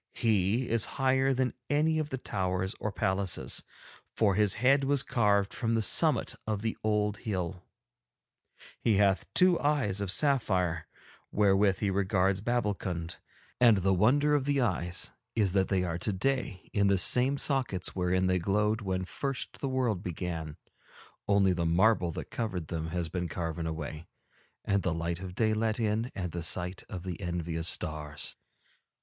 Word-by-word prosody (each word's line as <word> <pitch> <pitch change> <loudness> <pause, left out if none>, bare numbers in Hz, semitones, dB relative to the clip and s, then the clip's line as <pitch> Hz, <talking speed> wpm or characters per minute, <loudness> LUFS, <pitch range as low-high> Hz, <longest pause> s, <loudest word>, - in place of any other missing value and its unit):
He 110 +2 +1
is 115 -1 +1
higher 135 0 +2
than 130 -1 0 0.2
any 155 +2 +2
of 155 -1 -2
the 130 - -3
towers 95 -4 -2
or 105 - -2
palaces, 95 -1 0 0.5
for 105 -3 +3
his 105 0 +2
head 135 +5 +3
was 140 -1 +2
carved 100 -4 +1
from 115 -1 -1
the 110 - +1
summit - - +2
of 105 -1 -2
the 110 - -1
old 105 -1 +1
hill; 95 -4 -4 1.2
he 110 -4 +2
hath 100 -1 +2
two 180 -1 +5
eyes 130 -10 +1
of 100 - -2
sapphire 90 - +2 0.4
wherewith 100 -1 +3
he 100 -2 +1
regards 95 0 +1
Babbulkund, 100 -7 -2 0.4
and 120 -4 +6
the 95 +1 +2
wonder 140 +10 +3
of 145 -3 +1
the 140 -1 +1
eyes 90 -8 -1 0.2
is 100 -5 +2
that 95 -1 +2
they 95 -2 +1
are 85 -1 -3
today 105 0 -2
in 100 -1 +3
the 100 0 +3
same 125 +9 +4
sockets 130 -12 0
wherein 90 0 +1
they 90 0 +2
glowed 105 +4 +1
when 95 -2 -2
first 135 +7 -4
the 135 - -2
world 125 -8 0
began, 85 -4 -5 0.7
only 100 -2 +3
the 85 -1 -1
marble 90 +1 +3
that - - -7
covered 95 -9 -3
them 80 -1 -3
has 85 0 -2
been 90 +1 -3
carven 80 0 -4
away 80 0 -6 0.6
and 100 -1 +1
the 85 -2 -1
light 85 +1 -3
of 90 -1 -8
day 110 0 +2
let 110 +1 0
in 110 +2 -1
and 90 -3 -3
the 85 - -4
sight 90 +2 0
of 90 -3 -6
the 90 -1 -6
envious 85 -2 -2
stars. 75 -3 -2
100 Hz, 165 wpm, -29 LUFS, 90-115 Hz, 1.2 s, and